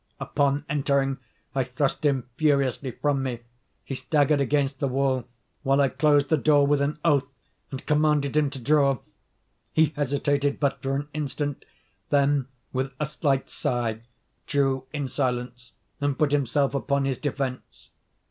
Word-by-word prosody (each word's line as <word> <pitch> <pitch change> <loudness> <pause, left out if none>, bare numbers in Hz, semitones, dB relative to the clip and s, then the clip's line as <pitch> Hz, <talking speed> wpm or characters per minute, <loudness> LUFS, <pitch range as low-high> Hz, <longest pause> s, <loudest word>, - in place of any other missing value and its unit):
Upon 140 0 0
entering, 140 -2 +1 0.3
I 135 -1 +1
thrust 130 +4 -2
him 135 -4 +1
furiously 140 -3 +1
from 140 +3 0
me. 125 -3 -3 0.4
He - - -6
staggered 145 +1 +2
against 140 -1 +1
the 140 - +1
wall, 130 -2 0 0.3
while 135 -1 +2
I 140 -1 +4
closed 145 -1 +3
the 160 - +4
door 145 0 +4
with 145 0 +2
an 145 +2 0
oath, 145 -5 +3 0.4
and 135 0 -7
commanded 150 -2 +2
him 150 -2 +3
to 135 -1 -8
draw. 140 +1 +3 0.7
He 160 0 +3
hesitated 145 0 0
but 140 -2 0
for 135 0 -1
an 145 +1 -3
instant; 145 -1 -3 0.4
then, 140 -2 +2 0.3
with 135 +1 -2
a 150 - +1
slight 140 -2 0
sigh, 115 -3 -1 0.5
drew 135 -2 +1
in 145 -3 -3
silence, 125 -2 -3 0.3
and 145 -2 0
put 150 -2 +2
himself 140 0 +1
upon 140 0 0
his 135 -3 -1
defence. 135 -3 -4
140 Hz, 150 wpm, -26 LUFS, 135-145 Hz, 0.7 s, I